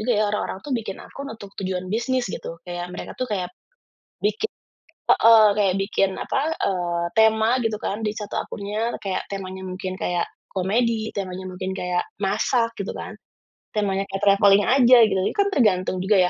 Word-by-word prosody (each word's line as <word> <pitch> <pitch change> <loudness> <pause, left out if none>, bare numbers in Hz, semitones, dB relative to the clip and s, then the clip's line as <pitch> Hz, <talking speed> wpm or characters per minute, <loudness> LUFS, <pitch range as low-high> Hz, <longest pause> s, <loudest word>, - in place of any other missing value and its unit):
juga 245 +3 +1 0.2
orang-orang 190 - -3
tuh 285 - -4
bikin 215 -5 -3
akun 280 0 -9
untuk 205 -3 -10
tujuan 185 -1 -3
bisnis, 245 +3 0
gitu. 165 -2 -6
Kayak, 175 0 -5
mereka 180 - -7
tuh 255 - -3
kayak 180 -3 -2 0.7
bikin 215 - +1 0.6
heeh, 225 -1 +7
kayak 195 -3 +3
bikin, 195 0 +1
apa, - - -2 0.2
eee, 175 -2 0
tema 220 +2 +4
gitu 225 -1 +1
kan 200 - -2
di 210 - 0
satu 210 -1 -5
akunnya, 210 +3 -3
kayak 190 -2 -2
temanya 190 -1 -5
mungkin 185 0 -5
kayak 175 -2 -1 0.3
komedi, 220 +4 0
temanya 185 -1 -4
mungkin 185 +1 -4
kayak 180 -1 -1 0.2
masak, 225 +4 +1
gitu 200 - -4
kan. - - -7 0.6
Temanya 195 -2 0
kayak 195 +1 -5
traveling 200 0 +5
aja, 250 -1 +6
gitu, 195 -3 +2
itu - - -3
kan 400 0 +2
tergantung 190 - +2
juga 190 +3 +2
200 Hz, 165 wpm, -23 LUFS, 185-225 Hz, 0.7 s, heeh